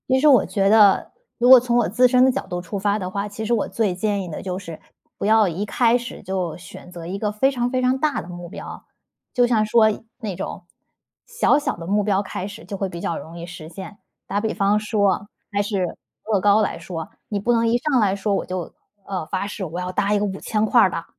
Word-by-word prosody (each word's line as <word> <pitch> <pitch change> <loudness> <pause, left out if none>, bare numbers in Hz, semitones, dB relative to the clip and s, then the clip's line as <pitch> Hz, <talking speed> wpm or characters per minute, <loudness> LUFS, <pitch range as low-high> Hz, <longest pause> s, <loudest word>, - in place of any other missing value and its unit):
其 260 0 +4
实 305 - +4
我 270 -5 +6
觉 195 -2 0
得 205 -2 +5 0.3
如 245 - +2
果 260 -1 +11
从 240 0 0
我 240 - +3
自 250 +6 +4
身 250 +1 +4
的 260 - +4
角 - - -3
度 180 -1 -4
出 185 +3 -5
发 205 +1 0
的 185 -2 -4
话， 200 +2 -3
其 215 +2 -6
实 235 - +1
我 225 - +1
最 210 -6 -1
建 200 +1 -1
议 - - -7
的 155 - -6
就 185 -1 -4
是 165 -5 -9 0.4
不 - - -3
要 215 0 +5
一 180 +4 -3
开 235 +3 +3
始 240 0 -8
就 185 -4 -3
选 180 0 -12
择 170 -2 -8
一 190 +3 -4
个 210 0 -1
非 215 +6 +2
常 245 -2 -1
非 255 0 0
常 255 +1 +2
大 300 +1 0
的 - - -12
目 175 -1 -8
标， - - -9 0.5
就 245 -2 +3
像 220 -3 +2
说 220 +1 +4 0.3
那 210 -6 -4
种 185 0 -6 0.6
小 465 - +2
小 295 - -1
的 165 -1 -8
目 205 +2 +2
标 200 -1 +1
开 195 -1 -5
始， 205 +3 -10
就 200 - -6
会 195 0 -2
比 170 - -7
较 170 - -2
容 165 +2 -9
易 170 - -6
实 165 -3 -10
现。 190 +4 -9 0.3
打 200 - -1
比 220 0 -1
方 200 +1 +2
说 210 -2 +2
啊， 200 +2 -3 0.2
还 205 0 +1
是 195 -4 -2 0.3
乐 205 - +3
高 205 +2 +4
来 210 - -1
说， 170 +1 -6 0.2
你 205 - -1
不 240 +4 +1
能 230 0 +2
一 235 +1 +3
上 265 0 +1
来 200 -3 +2
说 200 +1 -1
我 - - -2
就 180 -2 -5 0.3
呃， 185 -5 -3
发 190 +3 -2
誓 205 -1 -6
我 170 +1 -5
要 180 0 -3
搭 200 +2 0
一 205 - +2
个 205 - 0
5000 210 +2 -1
块 235 +2 +5
儿 190 - +5
的。 165 - -4
205 Hz, 270 characters per minute, -22 LUFS, 185-230 Hz, 0.6 s, 果